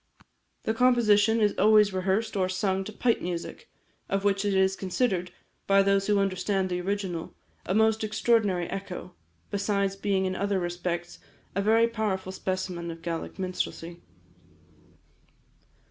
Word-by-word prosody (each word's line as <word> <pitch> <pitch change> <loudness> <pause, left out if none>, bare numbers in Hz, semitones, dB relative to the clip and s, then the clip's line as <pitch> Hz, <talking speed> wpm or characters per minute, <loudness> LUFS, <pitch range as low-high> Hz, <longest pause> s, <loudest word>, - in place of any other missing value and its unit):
The 220 - 0
composition 225 -3 +4
is 210 -2 +3
always 210 -1 +5
rehearsed 195 +4 0
or 185 -2 +1
sung 190 +1 0
to 215 - -6
pipe 235 +2 +1
music, 175 -1 -5 0.4
of 195 0 0
which 200 0 +1
it 200 -1 0
is 190 0 +3
considered, 185 -1 -1 0.4
by 195 0 +5
those 195 0 +2
who 210 -1 +3
understand 195 0 0
the 180 0 -1
original, 190 -3 -3 0.3
a 185 - 0
most 220 0 +3
extraordinary 215 -4 +1
echo, 195 -1 -6 0.4
besides 200 -1 0
being 195 -1 0
in 185 0 -1
other 200 0 0
respects 175 0 -4 0.3
a 200 - 0
very 225 +3 +4
powerful 210 -5 -2
specimen 185 -2 -3
of 165 0 -8
Gaelic 165 -1 -4
minstrelsy. 180 -2 -4
195 Hz, 140 wpm, -27 LUFS, 185-210 Hz, 0.4 s, always